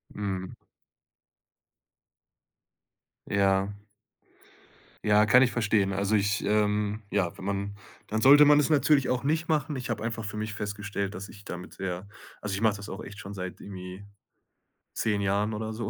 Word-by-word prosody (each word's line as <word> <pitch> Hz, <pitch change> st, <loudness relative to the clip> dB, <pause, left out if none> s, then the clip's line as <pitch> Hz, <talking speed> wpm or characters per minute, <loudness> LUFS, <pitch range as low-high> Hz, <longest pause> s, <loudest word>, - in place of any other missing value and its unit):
Mhm. 95 Hz, -3 st, -3 dB, 2.8 s
Ja. 100 Hz, 0 st, +2 dB, 1.3 s
Ja, 105 Hz, 0 st, +5 dB
kann 125 Hz, +5 st, +6 dB
ich 125 Hz, -, +4 dB
verstehen. 105 Hz, -4 st, +1 dB
Also 100 Hz, +2 st, +1 dB
ich, 100 Hz, -1 st, +1 dB
ähm 105 Hz, 0 st, +1 dB
ja, 95 Hz, -5 st, 0 dB
wenn -, -, -9 dB
man 100 Hz, 0 st, -2 dB, 0.3 s
dann 110 Hz, +1 st, -1 dB
sollte 145 Hz, +4 st, +8 dB
man 145 Hz, 0 st, +7 dB
es 150 Hz, -, +2 dB
natürlich 145 Hz, -2 st, +3 dB
auch 125 Hz, +1 st, 0 dB
nicht 160 Hz, +3 st, 0 dB
machen. 150 Hz, -1 st, 0 dB
Ich 125 Hz, -2 st, -5 dB
habe 110 Hz, -2 st, -2 dB
einfach 115 Hz, -1 st, -3 dB
für 105 Hz, +1 st, -5 dB
mich 110 Hz, 0 st, -3 dB
festgestellt, 100 Hz, -1 st, -4 dB
dass 95 Hz, +2 st, -6 dB
ich 100 Hz, 0 st, -13 dB
damit 90 Hz, -2 st, -8 dB
sehr 95 Hz, 0 st, -5 dB, 0.3 s
also, 105 Hz, -2 st, -4 dB
ich 100 Hz, -, -2 dB
mach 110 Hz, -2 st, +3 dB
das 105 Hz, +1 st, -8 dB
auch 95 Hz, -, -6 dB
echt 100 Hz, -, -10 dB
schon 100 Hz, -, -8 dB
seit 90 Hz, -2 st, -6 dB
irgendwie 95 Hz, 0 st, -8 dB, 0.9 s
10 105 Hz, -2 st, 0 dB
Jahren 100 Hz, +2 st, +1 dB
oder 110 Hz, +1 st, -3 dB
so. 115 Hz, +2 st, -4 dB
105 Hz, 160 wpm, -28 LUFS, 100-110 Hz, 2.8 s, sollte